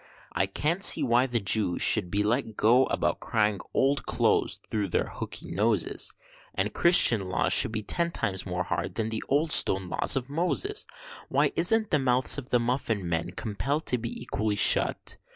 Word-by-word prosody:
I 95 - -1
can't 155 - -2
see 155 - +5
why 125 0 +1
the 120 -2 -1
Jews 100 -3 +1
should 100 -6 +4
be 100 +3 -1
let 110 0 -2
go 125 +4 +3
about - - -2
crying 105 -3 -1
Old 135 0 -1
Close - - 0
thro' 105 -2 -2
their 85 - -1
hooky - - -8
noses, 105 -1 -1 0.4
And - - -2
Christian 115 - +4
laws 95 - 0
should - - +5
be 110 -1 -5
ten 170 +9 -1
times 100 - -3
more 90 -1 -4
hard - - -5
than 110 -1 -3
the 110 0 -5
old 150 +3 0
stone 95 -1 +4
laws - - +2
of 130 -2 -3
Moses. 180 - -3 0.4
Why - - +1
isn't 215 +6 +2
the 150 - +2
mouths 130 +1 +3
of 130 - -11
the 125 - +1
muffin 115 -5 -3
men 80 -1 -3
compell'd 135 +8 -4
to 125 - +1
be 115 0 -7
equally 110 -3 -3
shut? 100 0 +3
115 Hz, 185 wpm, -26 LUFS, 100-140 Hz, 0.4 s, see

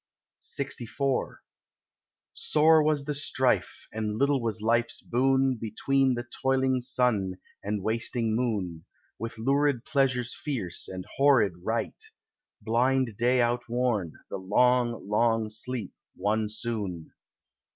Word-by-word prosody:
LXIV 135 0 -2 1.0
Sore 155 +1 +4
was 150 -2 +1
the 150 - -2
strife, 135 -3 0
and 105 -1 -2
little 140 +2 +2
was 115 -1 -1
life's 115 +2 +1
boon 130 +1 +2
Between 130 +4 +1
the 120 0 -5
toiling 130 -1 +2
sun 120 -7 +1 0.3
and 105 -1 -3
wasting 115 0 0
moon, 100 -9 -2 0.3
With 115 +1 -5
lurid 135 +1 +1
pleasures 135 -4 +1
fierce, 115 - -3
and 95 -1 -6
horrid 135 -9 +4
rite, - - -2 0.6
Blind 125 0 +1
day 125 +3 +3
outworn, 120 -6 0
the - - -5
long 120 +3 +2
long 115 +1 +1
sleep 110 -1 -4 0.2
won 105 +2 0
soon. 105 -7 -4
120 Hz, 110 wpm, -28 LUFS, 110-130 Hz, 1.0 s, Sore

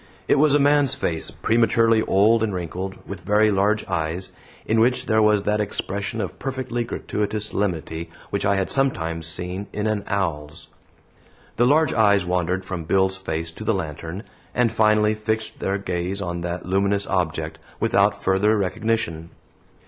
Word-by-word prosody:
It - - +4
was 150 -1 +5
a - - +4
man's 145 -1 +3
face, 80 -1 0
prematurely 115 0 +2
old 110 +3 +3
and 105 -4 0
wrinkled, 90 +2 -4
with - - -6
very 105 +2 +3
large 105 +2 +1
eyes, 85 0 -2 0.4
in 110 +1 +2
which 125 +2 +2
there 110 -3 +3
was 105 -1 +3
that 105 +1 +1
expression 100 +1 -3
of 95 -4 -4
perfectly 130 -2 -3
gratuitous 105 -2 -3
solemnity 85 -4 -3 0.2
which - - -1
I 100 - +2
had 95 -1 -1
sometimes 85 - -1
seen 90 +4 -3
in 105 - -3
an 110 -2 0
owl's. 80 -6 -3 0.9
The 120 +2 +4
large 155 +1 +3
eyes 100 -4 +4
wandered 90 +1 -1
from 90 -4 -5
Bill's 95 +2 +2
face 80 -3 -3
to 95 - -9
the 110 -1 +1
lantern, 85 +2 -5 0.3
and 120 -2 +2
finally 105 0 +3
fixed 110 +1 -3
their 100 +1 -1
gaze 90 0 -3
on 85 -3 -3
that 85 +1 -4
luminous 100 +2 +1
object, 90 -4 -2 0.2
without 100 0 +2
further 100 +3 +3
recognition. 95 -4 -1
100 Hz, 160 wpm, -23 LUFS, 90-110 Hz, 0.9 s, was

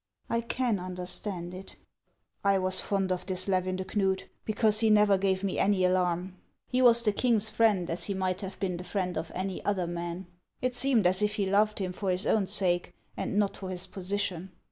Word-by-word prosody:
" - - -59
I 230 0 +1
can 235 -2 -1
understand 180 0 -5
it." 185 +1 -9 0.4
" - - -47
I - - +3
was 185 0 +2
fond 195 -2 -1
of 180 +1 -3
this 185 0 -1
Levin 185 -1 0
de 185 0 -4
Knud, 190 -1 0 0.2
because 215 -1 +3
he 225 -1 +4
never 210 -1 +5
gave 190 0 0
me 195 - -1
any 195 -2 +3
alarm. 180 0 0 0.3
He 255 0 0
was 235 -2 +6
the 215 - +3
king's 220 -1 +2
friend 210 -6 +2
as 170 +1 -3
he 200 - -2
might 185 -1 -1
have 195 -1 -7
been 185 -4 -2
the 180 - -6
friend 185 -2 -2
of 165 - -4
any 190 0 -4
other 195 -3 0
man. 175 +1 -5 0.3
It 255 0 -1
seemed 245 -5 +2
as 185 +2 +3
if 210 0 +1
he 205 -3 0
loved 210 +2 +2
him 185 -2 -3
for 195 +1 -3
his 185 +2 0
own 205 -3 +2
sake, 180 -3 +2 0.2
and 200 - -3
not 205 -1 +1
for 190 - -7
his 185 0 -3
position." 190 -1 -3
190 Hz, 215 wpm, -29 LUFS, 185-210 Hz, 0.4 s, was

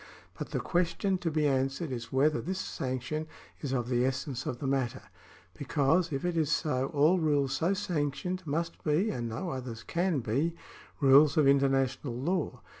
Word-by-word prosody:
But - - -6
the - - -2
question 180 +2 0
to 175 - -1
be 155 -1 +1
answered 135 +3 0
is 120 -2 -5
whether 150 +3 +2
this 185 +2 -3
sanction 130 -1 -3 0.3
is 140 - -4
of 120 -3 -1
the 125 -1 +1
essence 130 0 -2
of 120 - -2
the 140 - -6
matter; 130 -2 -1 0.5
because, 155 +5 +1
if 135 +3 -2
it 175 -1 0
is 155 -3 +1
so, 135 -3 +1
all 155 +6 +3
rules 145 -4 +1
so 170 +8 +1
sanctioned 180 0 -2
must 165 +3 -2
be, 165 +8 +2
and 120 -2 -3
no 140 +11 -4
others 125 -4 -6
can 175 -3 0
be, 140 +10 0 0.5
rules 140 +2 +6
of 150 -3 +5
international 135 -2 +2
law. 165 +6 -2
145 Hz, 175 wpm, -30 LUFS, 130-165 Hz, 0.5 s, rules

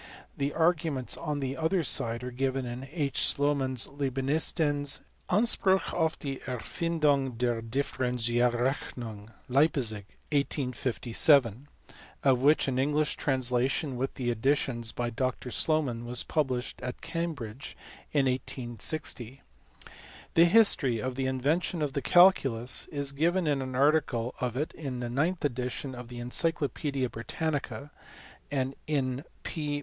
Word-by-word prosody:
The 140 +1 -1
arguments 160 -6 +1
on 150 -3 -3
the 135 0 -2
other 165 +3 +1
side 115 -3 +2
are 125 - -5
given 130 +1 -1
in 125 +2 -6
H. 150 -4 -1
Slornan 140 -2 +3
s 125 - +2
Leibnitzens 145 +2 0 0.3
Anspruch 190 -2 +2
auf 160 -2 0
die 135 -2 -5
Erfindung 140 0 0
der 120 -1 0
Differ 130 +3 -2
enzialreclmung, 120 -2 -1 0.2
Leipzig, 125 -7 +1 0.3
1857, 130 -2 +2 0.7
of 130 -3 +4
which 145 +2 +4
an 130 -1 0
English 150 +3 +1
translation, 130 +1 0
with 135 +2 -3
additions 120 -1 0
by 120 -1 -3
Dr 130 +1 -2
Slomau, 140 -7 +1
was 120 0 -1
published 130 -6 -2
at 125 0 -5
Cambridge 140 -9 -5 0.3
in 140 -2 +2
1860. 125 0 -3 0.9
The 165 - +7
history 170 - +4
of 130 +3 -2
the 130 +1 -2
invention 150 +6 0
of 140 -2 -2
the 140 - -1
Jculus 135 -11 +4
is 140 -2 0
given 170 +6 +1
in 145 -3 +1
an 130 -1 -5
article 135 -4 +2
on 125 -1 -2
it 150 +3 -1
in 135 -5 -5
the 120 -1 -4
ninth 160 +6 0
edition 130 +1 -3
of 125 -1 -8
the 120 0 -9
Encyclo 145 +5 0
paedia 135 0 -2
Britannica, 145 +3 -4 0.6
and 135 -1 -1
in 135 -3 -1 0.2
P. 150 -2 -3
135 Hz, 130 wpm, -29 LUFS, 125-150 Hz, 0.9 s, The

